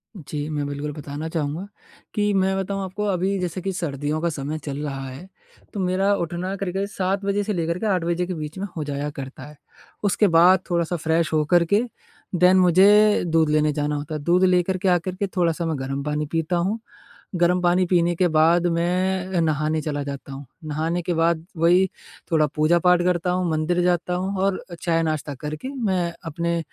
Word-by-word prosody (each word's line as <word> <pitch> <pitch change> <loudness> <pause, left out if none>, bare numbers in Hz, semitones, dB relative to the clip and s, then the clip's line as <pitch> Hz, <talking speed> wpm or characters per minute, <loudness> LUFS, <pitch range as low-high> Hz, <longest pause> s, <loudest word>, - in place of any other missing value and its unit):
जी 150 -3 -5
मैं 145 -2 -2
बिल्कुल 145 +1 -4
बताना 145 +1 -6
चाहूँगा, 160 +4 -3 0.5
कि 205 -1 +1
मैं 190 0 +2
बताऊँ 195 +1 -2
आपको 205 +3 -4
अभी 195 0 0
जैसे 180 0 -3
कि 195 - -2
सर्दियों 150 -2 -2
का 170 - +1
समय 150 0 -4
चल 140 -1 -4
रहा 135 -2 -4
है, 135 +9 -9 0.5
तो 205 - -4
मेरा 190 +2 +2
उठना 175 +2 -3
करीब-करीब 195 +1 -2
7 195 0 -2
बजे 200 +1 +1
से 210 0 -2
लेकर 170 0 -1
के 220 - -3
8 185 -4 +1
बजे 175 +1 0
के 185 - -3
बीच 155 +1 -6
में 200 +2 -3
हो 155 - -1
जाया 145 0 -3
करता 135 -2 -8
है। 150 -1 -14 0.5
उसके 205 +1 +3
बाद 175 +2 +6
थोड़ा-सा 170 0 0
फ्रेश 160 0 0
हो 155 -1 +3
करके 175 +7 +3 0.5
देन 180 +2 +5
मुझे 200 +4 +5
दूध 160 -2 +2
लेने 150 0 +3
जाना 150 0 -1
होता 150 +2 -4
है, 150 - -4
दूध 180 +3 +3
लेकर 185 0 +3
के 190 +1 -2
आकर 180 +1 +1
के 200 +1 -2
थोड़ा-सा 170 -1 +1
मैं 160 -3 -1
गर्म 135 +1 -3
पानी 150 0 -1
पीता 165 +2 0
हूँ, 200 +6 -1 0.6
गर्म 175 +1 +3
पानी 175 +1 +3
पीने 175 -1 +2
के 180 0 +3
बाद 165 +3 +4
मैं 180 +2 0
नहाने 155 0 0
चला 145 -1 -2
जाता 140 -1 -7
हूँ, 140 +1 -7 0.2
नहाने 160 +3 -2
के 175 0 -1
बाद 165 0 +1
वही 175 +3 +4 0.5
थोड़ा 155 -1 +4
पूजा-पाठ 175 +3 +4
करता 180 0 +1
हूँ, 180 -2 0
मंदिर 160 +3 0
जाता 180 0 +1
हूँ 190 +2 -2
और 195 -1 0 0.2
चाय 165 -2 +1
नाश्ता 155 -2 -2
करके, 150 - -6
मैं 190 -10 -1
अपने 170 +2 -1
170 Hz, 195 wpm, -23 LUFS, 155-185 Hz, 0.6 s, बाद